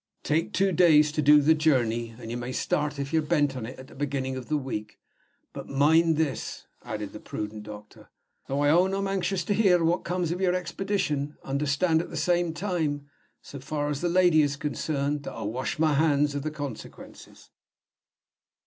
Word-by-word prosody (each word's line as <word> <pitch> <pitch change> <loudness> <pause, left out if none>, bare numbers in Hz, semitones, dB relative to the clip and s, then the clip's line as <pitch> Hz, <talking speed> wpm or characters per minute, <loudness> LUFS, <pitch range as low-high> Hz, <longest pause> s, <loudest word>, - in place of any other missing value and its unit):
"Take 160 +2 0
two 195 +1 +2
days 155 -4 +5
to 155 - -1
do 150 0 +6
the 160 +3 +5
journey, 120 -7 +1
and 115 -2 -8
you - - -3
may 120 +1 -5
start, 150 +2 -1
if 140 +2 -4
you're 160 - +3
bent 150 -3 +1
on 120 -3 -5
it, 130 - -9
at 130 - -10
the - - -16
beginning 135 -2 -3
of 130 -2 -7
the 155 - 0
week. 115 -6 -5 0.6
But - - -8
mind 160 +3 +3
this," 155 -4 -2 0.2
added 105 -2 -6
the - - -8
prudent 105 0 -6
doctor, 105 0 -12 0.4
"though 140 +1 -1
I 145 0 +4
own 185 +4 +3
I'm 195 0 -1
anxious 195 -1 -1
to 205 - 0
hear 190 -5 +4
what 170 +2 +1
comes 175 -1 -1
of 180 +2 -3
your 180 -1 +2
expedition 170 -5 -2
understand 150 +4 +1
at - - -8
the - - -6
same 175 -1 +1
time, 160 -5 -3 0.3
so 140 - -9
far 145 +2 -3
as 145 -1 -3
the 175 - 0
lady 175 -3 +4
is 145 -1 0
concerned, 145 0 -2
that - - -6
I 115 - -6
wash 120 +9 -3
my 155 -1 +2
hands 145 -1 +2
of 145 - -3
the 155 - -2
consequences." 145 -6 -9
150 Hz, 195 wpm, -27 LUFS, 135-170 Hz, 0.6 s, do